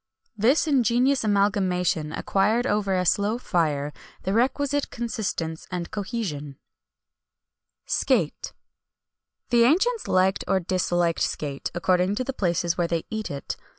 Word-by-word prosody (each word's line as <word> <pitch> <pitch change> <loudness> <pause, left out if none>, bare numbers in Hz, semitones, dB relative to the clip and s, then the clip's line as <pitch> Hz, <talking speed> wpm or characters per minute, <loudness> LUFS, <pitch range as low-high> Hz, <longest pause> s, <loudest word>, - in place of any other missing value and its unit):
This 235 +11 +3
ingenious 260 -1 +2
amalgamation 190 -6 +1
acquired 215 +8 +1
over 205 -4 +1
a 180 0 0
slow 205 +5 +2
fire 150 - -1 0.3
the 190 - -1
requisite 280 +5 +1
consistence 200 -9 -4
and 175 -2 -4
cohesion.[XXI 190 - -4 1.5
163] - - +5
SCATE. - - -10 1.0
The 235 -1 +5
ancients 395 - +2
liked 185 +1 +2
or 195 - +2
disliked 175 -2 0
scate, 140 -2 -2
according 180 +2 +2
to 255 - -1
the 270 - -4
places 175 -4 0
where 170 - +2
they 170 -1 -2
eat 220 -1 -3
it. 140 -1 -5
195 Hz, 125 wpm, -25 LUFS, 175-235 Hz, 1.5 s, 163